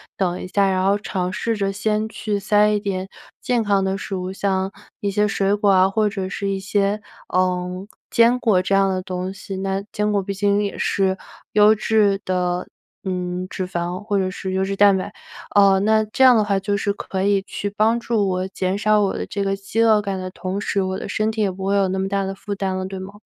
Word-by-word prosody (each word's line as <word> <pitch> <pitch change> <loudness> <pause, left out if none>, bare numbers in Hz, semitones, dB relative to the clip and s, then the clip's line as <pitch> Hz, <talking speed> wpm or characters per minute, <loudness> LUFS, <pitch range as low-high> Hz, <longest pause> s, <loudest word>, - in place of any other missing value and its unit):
等 180 -2 -1
一 - - -6
下， 195 +1 +2
然 185 0 0
后 200 +1 +3
尝 185 -3 -3
试 225 +1 -1
着 195 -1 -1
先 210 +2 0
去 215 -1 -3
塞 210 +1 +3
一 210 0 +1
点 195 -2 -3 0.3
健 245 -3 +1
康 200 -2 +2
的 190 0 -1
食 195 -1 -5
物， 185 0 -4
像 190 0 -1 0.3
一 200 -1 -1
些 210 +1 +2
水 195 0 +1
果 205 0 +2
啊 190 -1 +5
或 215 +2 +1
者 195 -2 -4
是 200 0 -3
一 195 - -1
些， 200 +1 0 0.3
呃， 180 +1 -1 0.2
坚 235 +2 +4
果 210 -7 +3
这 195 - -1
样 195 0 +4
的 185 -1 -1
东 185 +1 -4
西， 195 0 -7
那 195 +1 -2
坚 210 0 0
果 200 - +2
毕 200 - -4
竟 200 +1 +1
也 200 - -4
是 190 -1 +1 0.4
优 210 +1 +6
质 210 -2 +2
的， 180 -1 -1 0.4
嗯， 180 -1 -3
脂 185 -1 -4
肪 175 0 -3
或 205 -1 0
者 185 -1 0
是 190 0 -5
优 190 0 +1
质 195 +1 -2
蛋 200 -1 +6
白， 205 +2 -5 0.4
呃， 195 -1 +6
那 215 +1 +3
这 240 +5 +1
样 255 -2 +8
的 215 - +3
话 200 -1 +1
就 200 +1 -1
是 200 0 0
可 190 -2 -4
以 200 -1 +2
去 205 0 -4
帮 220 +3 +2
助 225 -3 0
我 185 +1 -1
减 190 0 -2
少 215 0 +3
我 200 - +1
的 - - -3
这 200 -1 -3
个 195 0 0
饥 200 +3 -2
饿 220 -2 +5
感 195 -2 -3
的 185 0 -5
同 185 +2 -4
时， 200 - 0
我 190 0 -2
的 - - -6
身 215 +1 0
体 220 0 -3
也 200 - +1
不 190 +1 -6
会 200 +1 +1
有 195 -1 +3
那 190 +1 -1
么 190 - -1
大 195 0 0
的 195 - -3
负 200 +1 -5
担 190 -1 -2
了， 185 - -3
对 190 0 -6
吗？ 195 +2 -9
195 Hz, 260 characters per minute, -21 LUFS, 190-210 Hz, 0.4 s, 样